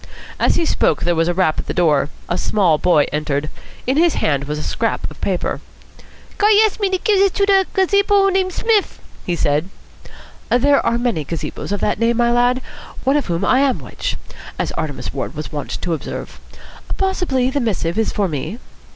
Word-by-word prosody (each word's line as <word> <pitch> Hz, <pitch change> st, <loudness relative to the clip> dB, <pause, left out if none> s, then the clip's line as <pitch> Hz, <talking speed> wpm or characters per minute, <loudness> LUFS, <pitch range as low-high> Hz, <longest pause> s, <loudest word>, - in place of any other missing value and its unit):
As -, -, +3 dB
he 335 Hz, -, +1 dB
spoke 160 Hz, -, +1 dB
there 175 Hz, -, +2 dB
was 165 Hz, 0 st, +1 dB
a 175 Hz, -, +1 dB
rap 180 Hz, -4 st, +1 dB
at -, -, -5 dB
the -, -, -3 dB
door. 150 Hz, -5 st, +2 dB, 0.2 s
A 175 Hz, -, -1 dB
small 180 Hz, -4 st, +2 dB
boy 165 Hz, -5 st, +4 dB
entered. 150 Hz, 0 st, -2 dB, 0.3 s
In 260 Hz, +3 st, +1 dB
his 335 Hz, 0 st, +3 dB
hand 140 Hz, -2 st, 0 dB
was 150 Hz, +1 st, -3 dB
a 150 Hz, -, -4 dB
scrap 225 Hz, -1 st, -1 dB
of -, -, -15 dB
paper. 185 Hz, -3 st, -1 dB, 0.8 s
"Guy 420 Hz, +1 st, +5 dB
asks 430 Hz, -, -2 dB
me 400 Hz, -2 st, +1 dB
give 375 Hz, -1 st, -2 dB, 0.2 s
dis 395 Hz, 0 st, +5 dB
to 395 Hz, -1 st, +3 dB
gazebo 400 Hz, +1 st, +3 dB
named 375 Hz, -1 st, +1 dB
Smiff," 435 Hz, +1 st, +1 dB, 0.3 s
he 175 Hz, -, 0 dB
said. 150 Hz, +2 st, 0 dB, 0.8 s
"There 280 Hz, +4 st, +3 dB
are 235 Hz, -, +1 dB
many 240 Hz, -10 st, -1 dB
gazebos 165 Hz, +5 st, -5 dB
of 205 Hz, -, -2 dB
that 210 Hz, -, 0 dB
name, 230 Hz, 0 st, +2 dB
my 235 Hz, 0 st, +3 dB
lad. 245 Hz, +1 st, +2 dB, 0.4 s
One 270 Hz, +2 st, +2 dB
of 295 Hz, -, 0 dB
whom 170 Hz, +2 st, -1 dB
I 255 Hz, -, +4 dB
am 275 Hz, -2 st, +2 dB
which, -, -, -5 dB, 0.4 s
as -, -, -2 dB
Artemus 145 Hz, -5 st, -4 dB
Ward 140 Hz, +2 st, -4 dB
was 155 Hz, +1 st, -6 dB
wont 145 Hz, -3 st, -5 dB
to 175 Hz, -, -2 dB
observe. 160 Hz, -, -6 dB, 0.6 s
Possibly 355 Hz, -10 st, 0 dB
the 285 Hz, -, 0 dB
missive 205 Hz, -6 st, -1 dB
is 225 Hz, -, +1 dB
for 200 Hz, -2 st, 0 dB
me." 155 Hz, -, -4 dB
220 Hz, 195 wpm, -19 LUFS, -, 0.8 s, Guy